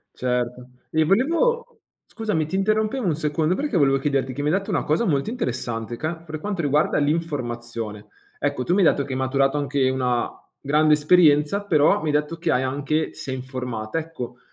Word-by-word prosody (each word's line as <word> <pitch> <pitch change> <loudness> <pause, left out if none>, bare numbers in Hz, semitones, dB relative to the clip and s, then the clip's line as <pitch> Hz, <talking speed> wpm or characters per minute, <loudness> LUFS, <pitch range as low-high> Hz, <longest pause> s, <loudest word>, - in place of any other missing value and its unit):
Certo. 125 0 -2 0.2
E 160 0 +3
volevo 340 - +1 0.3
scusami, 210 -9 -1
ti 185 - -4
interrompevo 215 +4 +1
1 160 -4 +1
secondo 155 +2 0
perché 285 -7 -2
volevo 135 -2 +4
chiederti 135 -2 0
che 140 +3 -5
mi 145 - -1
hai 185 - +3
detto 200 +2 -6
una 185 - 0
cosa 155 +10 +1
molto 145 +3 0
interessante 120 - -3
ca 160 +2 -2
per 160 -2 -8
quanto 195 -1 -3
riguarda 150 +1 +2
l'informazione. 120 -8 -3 0.3
Ecco, 145 -3 -1
tu 175 - 0
mi 200 - +3
hai - - +7
detto 140 - -2
che 135 - -7
hai - - -2
maturato 135 +2 +1
anche 140 -2 +1
una 125 -2 0 0.3
grande 150 +2 +3
esperienza, 150 +4 +4
però 155 -5 +4
mi 155 - -3
hai - - +2
detto 150 +3 -1
che 165 - -2
hai 125 +1 +2
anche 145 +4 -1
ti - - -18
sei 130 -1 -4
informata. 125 0 -4
Ecco, 125 -7 -7
150 Hz, 195 wpm, -23 LUFS, 130-170 Hz, 0.3 s, hai